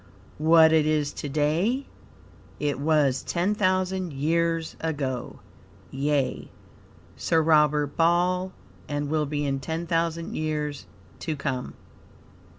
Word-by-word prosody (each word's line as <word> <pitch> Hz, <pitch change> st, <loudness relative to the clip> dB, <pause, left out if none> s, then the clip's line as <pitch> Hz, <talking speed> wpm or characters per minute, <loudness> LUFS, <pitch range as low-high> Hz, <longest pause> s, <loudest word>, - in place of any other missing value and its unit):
What 160 Hz, +1 st, +6 dB
it 155 Hz, -1 st, +4 dB
is 150 Hz, -2 st, 0 dB
to 145 Hz, -, -5 dB
day 165 Hz, -, +1 dB, 0.7 s
it 145 Hz, -2 st, -1 dB
was 145 Hz, -3 st, +2 dB
ten 180 Hz, +4 st, 0 dB
thousand 185 Hz, -3 st, 0 dB
years 165 Hz, +3 st, 0 dB
ago 140 Hz, -6 st, -3 dB, 0.5 s
yea, 140 Hz, 0 st, -1 dB, 0.7 s
Sir 165 Hz, -, +1 dB
Robert 150 Hz, -2 st, +3 dB
Ball, 180 Hz, +2 st, +2 dB, 0.4 s
and 145 Hz, 0 st, -2 dB
will 155 Hz, -2 st, +1 dB
be 145 Hz, 0 st, -2 dB
in 135 Hz, -1 st, -1 dB
ten 160 Hz, +4 st, -4 dB
thousand 165 Hz, 0 st, -1 dB
years 150 Hz, -7 st, -3 dB, 0.3 s
to 160 Hz, -2 st, -3 dB
come. 135 Hz, -3 st, -4 dB
155 Hz, 115 wpm, -26 LUFS, 145-170 Hz, 0.7 s, What